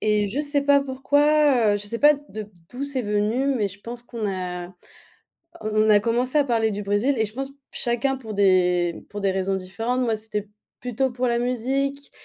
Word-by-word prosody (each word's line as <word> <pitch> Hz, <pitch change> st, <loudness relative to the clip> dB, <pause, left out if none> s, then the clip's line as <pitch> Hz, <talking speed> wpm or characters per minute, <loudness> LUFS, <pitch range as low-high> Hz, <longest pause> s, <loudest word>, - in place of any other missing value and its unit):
et 210 Hz, -1 st, +1 dB
je 265 Hz, -, -3 dB
sais 290 Hz, -1 st, 0 dB
pas 285 Hz, 0 st, +5 dB
pourquoi, 280 Hz, -2 st, +3 dB
heu, -, -, +1 dB
je 205 Hz, -, -6 dB
sais 230 Hz, +2 st, -3 dB
pas 295 Hz, +1 st, +6 dB
de 220 Hz, -8 st, -9 dB, 0.2 s
d'où 260 Hz, +3 st, -4 dB
c'est 280 Hz, -3 st, -2 dB
venu, 210 Hz, +5 st, 0 dB
mais 210 Hz, -, +1 dB
je 200 Hz, +1 st, -10 dB
pense 240 Hz, +2 st, -7 dB
qu'on 235 Hz, -3 st, -6 dB
a 180 Hz, -2 st, -4 dB
a -, -, -16 dB, 0.9 s
on 215 Hz, 0 st, +1 dB
a 210 Hz, -, +7 dB
commencé 245 Hz, +6 st, 0 dB
à 290 Hz, -, +5 dB
parler 230 Hz, -4 st, +1 dB
du 205 Hz, 0 st, -4 dB
Brésil 205 Hz, +8 st, +1 dB
et 220 Hz, -, +2 dB
je 210 Hz, -, -8 dB
pense 270 Hz, +2 st, -4 dB, 0.2 s
chacun 240 Hz, +2 st, 0 dB
pour 220 Hz, -5 st, -8 dB
des 180 Hz, -3 st, +2 dB
pour 205 Hz, -, -6 dB
des 195 Hz, -1 st, +1 dB
raisons 190 Hz, 0 st, -1 dB
différentes. 225 Hz, +7 st, -2 dB
Moi 230 Hz, -3 st, +1 dB
c'était 210 Hz, -1 st, -5 dB, 0.3 s
plutôt 250 Hz, +2 st, -1 dB
pour 245 Hz, +1 st, -2 dB
la 235 Hz, 0 st, +1 dB
musique, 270 Hz, +4 st, -1 dB
230 Hz, 205 wpm, -24 LUFS, 205-265 Hz, 0.9 s, a